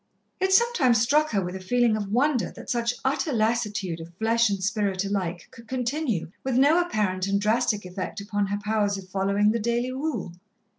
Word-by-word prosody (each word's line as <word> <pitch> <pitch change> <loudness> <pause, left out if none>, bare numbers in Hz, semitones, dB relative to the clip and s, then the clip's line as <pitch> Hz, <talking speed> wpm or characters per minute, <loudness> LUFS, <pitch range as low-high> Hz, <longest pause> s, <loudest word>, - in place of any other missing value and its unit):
It 380 0 +1
sometimes 380 - +4
struck 295 +7 +3
her 195 -4 0
with 180 +1 -5
a - - -5
feeling 235 +4 +2
of 205 -2 -3
wonder 255 +1 +2
that - - -7
such 235 0 0
utter 280 +3 0
lassitude 215 -7 0
of 165 +1 -11
flesh 225 +2 +2
and 195 -1 -2
spirit 200 -1 0
alike 185 -4 -3
could 230 -3 -14
continue 250 - -2
with 265 -2 -1
no 295 +6 +5
apparent 200 - -1
and 200 0 +1
drastic 215 -1 +1
effect 185 +3 -5
upon 205 0 -1
her 205 +1 -1
powers 205 -1 0
of 190 -1 -9
following 200 +2 +2
the 230 - -1
daily 235 +3 -1
rule. 260 - -3
215 Hz, 190 wpm, -25 LUFS, 200-250 Hz, -, no